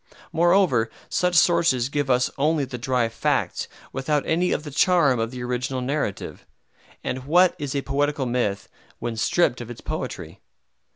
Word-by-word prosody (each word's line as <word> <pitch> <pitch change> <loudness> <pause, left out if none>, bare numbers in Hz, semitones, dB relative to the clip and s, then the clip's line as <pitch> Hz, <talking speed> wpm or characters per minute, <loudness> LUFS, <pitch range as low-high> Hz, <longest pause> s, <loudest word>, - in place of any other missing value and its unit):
Moreover, 170 - +3 0.2
such 180 0 +1
sources 165 -8 +4
give 145 -1 -2
us 125 0 +2
only 150 +1 +1
the 125 -1 -7
dry 125 -1 +1
facts 115 - -1 0.3
without 140 +2 0
any 175 +3 +1
of 150 - -1
the 150 - -7
charm 145 -4 +3
of 115 0 -1
the 125 0 -7
original 125 +2 -2
narrative; 125 -5 -3 0.6
and 130 0 -4
what 180 +4 +4
is 145 -2 -4
a 140 - -1
poetical 145 0 0
myth 120 -5 -1 0.3
when 120 -1 -4
stripped 125 +2 +1
of 120 - -8
its 120 - -8
poetry? - - -6
135 Hz, 160 wpm, -24 LUFS, 125-155 Hz, 0.6 s, sources